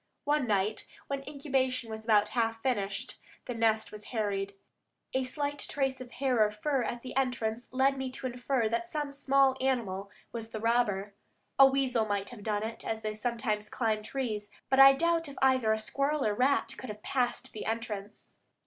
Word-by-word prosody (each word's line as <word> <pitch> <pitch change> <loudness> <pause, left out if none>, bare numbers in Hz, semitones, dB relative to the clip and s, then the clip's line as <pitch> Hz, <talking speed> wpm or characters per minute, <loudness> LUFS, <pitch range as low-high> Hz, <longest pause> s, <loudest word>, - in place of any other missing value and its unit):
One 290 -3 +1
night, 205 0 0 0.2
when 275 -1 -3
incubation 265 -4 0
was 220 0 -6
about 210 -2 +4
half 225 -1 -1
finished, 200 -6 -2 0.3
the 245 - -3
nest 225 -1 +1
was 210 0 -9
harried. 200 -4 -2 0.6
A 260 - +1
slight 285 +2 -2
trace 270 -2 -1
of 250 - -8
hair 255 -3 +1
or 210 - +3
fur 260 +6 -1
at 240 0 -3
the 255 - -7
entrance 245 -3 -1
led 265 +1 +2
me 265 -1 -2
to 265 - -6
infer 250 -1 0
that 235 +10 -2
some 295 -4 -2
small 275 -1 +3
animal 210 -7 -1 0.2
was 225 -1 -6
the 220 - -5
robber. 210 -3 +1 0.5
A 270 - +11
weasel 265 -4 +1
might 200 0 -2
have 235 -4 -10
done 210 0 -1
it, 225 +1 -5
as 220 0 -3
they 215 0 -2
sometimes 215 -2 -2
climb 220 -3 0
trees, 215 -3 -3 0.2
but 265 - +4
I 270 0 +11
doubt 330 +2 +1
if 280 - -11
either 260 -4 +4
a 220 - +3
squirrel 275 +6 0
or 215 - +3
a - - -1
rat 260 +6 +2
could 255 - -7
have 210 0 -8
passed 250 -3 -1
the 215 - -5
entrance. 215 -2 -5
240 Hz, 190 wpm, -30 LUFS, 215-270 Hz, 0.6 s, A